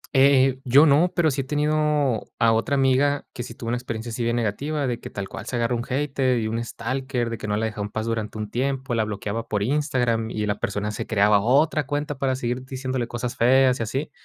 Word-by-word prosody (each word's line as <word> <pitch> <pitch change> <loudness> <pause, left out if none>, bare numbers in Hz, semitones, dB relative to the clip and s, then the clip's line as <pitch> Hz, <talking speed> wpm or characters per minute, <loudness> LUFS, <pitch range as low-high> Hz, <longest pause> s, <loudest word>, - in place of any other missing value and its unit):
Eh 135 0 +6
eh, 130 0 -6
yo 140 +5 +6
no, 155 +5 +4
pero 160 -4 +3
sí 135 +1 -1
he - - -5
tenido 150 -3 +1
a 115 -1 +4
otra 115 +5 +1
amiga 135 +1 +2
que 120 - -6
sí 115 - -8
tuvo 115 - -6
una 120 - 0
experiencia 120 -1 -5
así 120 +1 -3
bien 115 +1 0
negativa, 140 +7 -1
de 120 -2 -2
que - - -8
tal 100 -1 -5
cual - - -8
se 125 - -3
agarra 120 +1 0
un 120 - -1
hater 135 -2 0
y 110 - -2
un 115 +1 -2
stalker, 125 0 -3
de 115 - -5
que 110 - -5
no 105 0 0
la 110 - 0
dejó 105 -2 -4
en 100 - -3
paz 110 +1 -3
durante 110 -2 -3
un 105 -1 -5
tiempo, 135 0 -2
la 110 -2 +1
bloqueaba 105 +2 -4
por 105 -1 -1
Instagram 125 -4 0
y, 105 -1 -3
eh, - - -1
la 105 0 -1
persona 105 +1 -2
se - - -5
creaba 105 -1 +4
otra 145 +4 +2
cuenta 145 -1 -3
para 130 -1 +1
seguir 125 0 -3
diciéndole 130 -2 -3
cosas 120 +1 -4
feas 130 +1 +4
y - - 0
así. 135 +7 -3
125 Hz, 250 wpm, -24 LUFS, 115-135 Hz, -, Eh